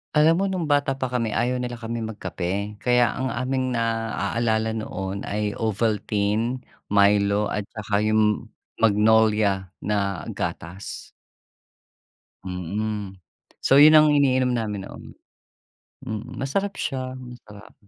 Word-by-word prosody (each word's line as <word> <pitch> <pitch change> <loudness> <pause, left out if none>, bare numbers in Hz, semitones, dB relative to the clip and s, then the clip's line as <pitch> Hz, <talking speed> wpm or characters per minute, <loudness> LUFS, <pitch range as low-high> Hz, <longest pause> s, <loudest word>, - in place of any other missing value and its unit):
Alam 155 +2 +6
mo 195 - +1
nung 185 -3 -2
bata 145 -3 +1
pa 130 -2 -3
kami, 115 -4 -1
ayaw 125 +1 0
nila 125 -1 -4
kaming 115 -1 -4
magkape. 95 +3 -4
Kaya, 125 0 +3
ang 130 - -1
aming 130 0 -1
naaalala 115 0 0
noon 100 -3 -4
ay 105 0 -1
Ovaltine, 110 +2 0 0.2
Milo, 100 0 +3
at 105 -1 -3
tsaka 105 -1 -2
yung 110 0 +2 0.3
Magnolia 105 -2 +3 0.2
na 100 -4 -1
gatas. 90 +4 -6 1.3
Mm. 95 +2 -4 0.5
So, 135 - +6
yun 155 +2 +9
ang 155 0 +7
iniinom 130 -3 +3
namin 105 -4 -2
noon. - - -10 1.0
Mhm, 110 +4 -6
masarap 195 +9 -1
siya. 130 -2 -3
Masarap. 120 -5 -12
110 Hz, 115 wpm, -24 LUFS, 105-125 Hz, 1.3 s, yun